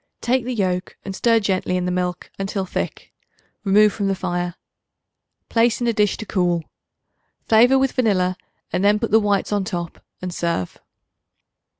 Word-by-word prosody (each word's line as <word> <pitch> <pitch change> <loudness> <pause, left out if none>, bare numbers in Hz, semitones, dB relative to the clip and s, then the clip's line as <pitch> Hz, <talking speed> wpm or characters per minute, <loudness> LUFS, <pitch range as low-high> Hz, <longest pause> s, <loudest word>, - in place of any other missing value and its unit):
Take 250 0 0
the 250 0 -2
yolk, 185 -3 -1
and 195 -1 -5
stir 230 +2 +3
gently 190 -3 0
in 180 - -1
the 180 - -1
milk 180 -1 -3
until 195 0 -2
thick. - - -5 0.5
Remove 210 +1 +5
from 200 -2 -2
the 195 - +1
fire. 175 -1 -3 0.9
Place 230 0 +2
in 240 - -1
a 235 - +2
dish 210 -2 +1
to 220 - -6
cool. 175 -4 0 0.8
Flavor 240 +4 +6
with 265 -1 +2
vanilla 185 -7 +1 0.4
and 180 +2 0
then 205 +1 +5
put 230 0 -3
the 220 - +6
whites 205 -2 0
on 205 -1 +1
top 175 -4 -5 0.2
and 180 -1 -5
serve. 170 - -2
195 Hz, 170 wpm, -21 LUFS, 180-220 Hz, 0.9 s, Flavor